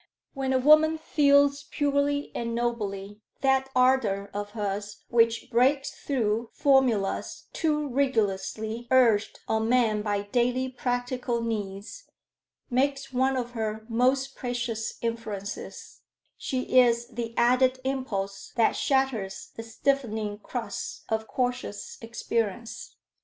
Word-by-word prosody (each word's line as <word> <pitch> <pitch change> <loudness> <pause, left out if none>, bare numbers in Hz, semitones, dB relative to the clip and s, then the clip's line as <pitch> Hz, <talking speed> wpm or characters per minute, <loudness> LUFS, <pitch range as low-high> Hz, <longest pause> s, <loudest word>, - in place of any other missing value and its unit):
When 270 -1 -2
a 260 - +3
woman 310 +4 +5
feels 285 -2 +3
purely 285 0 0
and 235 0 -3
nobly, 210 -4 -3 0.2
that 265 0 +2
ardor 245 -6 +2
of 205 0 -5
hers 205 0 -4
which 230 -1 +2
breaks 265 +4 +3
through 230 -4 -1
formulas 260 -9 +2
too 300 -2 0
rigorously 225 -3 -1
urged 235 -5 +3
on 220 0 0
men 230 -4 +3
by 205 -1 -1
daily 250 +4 0
practical 245 -1 -2
needs, 210 - -5 0.6
makes 275 +1 0
one 260 +1 +2
of 245 -1 -3
her 220 -2 -3
most 260 +3 +1
precious 235 -3 -3
influences: 220 -4 -5 0.3
she 255 0 +1
is 235 -1 +4
the 230 -1 -5
added 255 +2 +3
impulse 205 -8 -3
that 230 -2 +3
shatters 260 -8 -1
the - - -5
stiffening 225 -3 -1
crust 235 +2 -5
of 220 0 -1
cautious 250 -4 -3
experience. 230 -1 -3
240 Hz, 115 wpm, -27 LUFS, 220-265 Hz, 0.6 s, woman